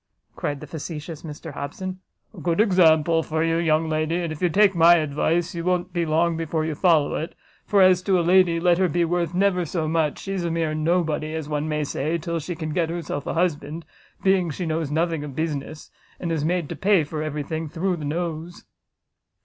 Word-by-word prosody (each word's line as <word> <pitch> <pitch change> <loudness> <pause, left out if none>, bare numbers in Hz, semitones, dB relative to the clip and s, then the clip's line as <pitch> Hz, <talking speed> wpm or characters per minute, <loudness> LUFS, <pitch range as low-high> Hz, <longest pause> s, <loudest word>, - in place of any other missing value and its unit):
cried 145 -1 -3
the - - -7
facetious 155 0 -7
Mr 155 -1 -8
Hobson; 185 +7 -5 0.4
"a - - -9
good 170 0 0
example 165 -5 +4
for 160 0 -1
you, 165 0 +1
young 160 -1 +2
lady; 155 +1 0
and 170 -2 -3
if 155 - -11
you 180 - +3
take 200 +3 +4
my 170 0 +7
advice, 160 +2 0
you 170 -1 -4
won't 180 0 0
be 170 -2 0
long 165 +2 +2
before 160 -1 -2
you 160 - -2
follow 155 -2 +3
it; 160 - -4 0.3
for 200 -2 +5
as 185 -1 +5
to 185 -1 +2
a 170 - 0
lady, 175 -1 +4
let 175 0 +3
her 190 - +3
be 170 +3 +1
worth 175 0 -1
never 185 -1 +2
so 160 -1 -2
much, 160 -2 0
she's 195 -2 -4
a 170 - -1
mere 165 -2 -1
nobody, 155 -1 0
as 160 -2 -4
one 150 +1 -2
may 150 0 0
say, 150 +3 -1
till 170 0 -3
she 170 +3 -5
can 155 -1 -4
get 165 -1 0
herself 165 -4 -4
a - - -2
husband, 160 -2 -1 0.4
being 190 -3 +3
she 175 +4 -4
knows 160 -2 -1
nothing 160 0 0
of 145 -3 -7
business, 155 -1 -4 0.3
and 170 - -3
is 160 -3 -1
made 170 0 0
to - - -5
pay 195 -4 +3
for 155 +1 -5
every 150 -1 -3
thing 160 +1 -4
through 180 +4 -1
the 160 - -7
nose." 165 +2 -4
165 Hz, 215 wpm, -24 LUFS, 155-175 Hz, 0.4 s, my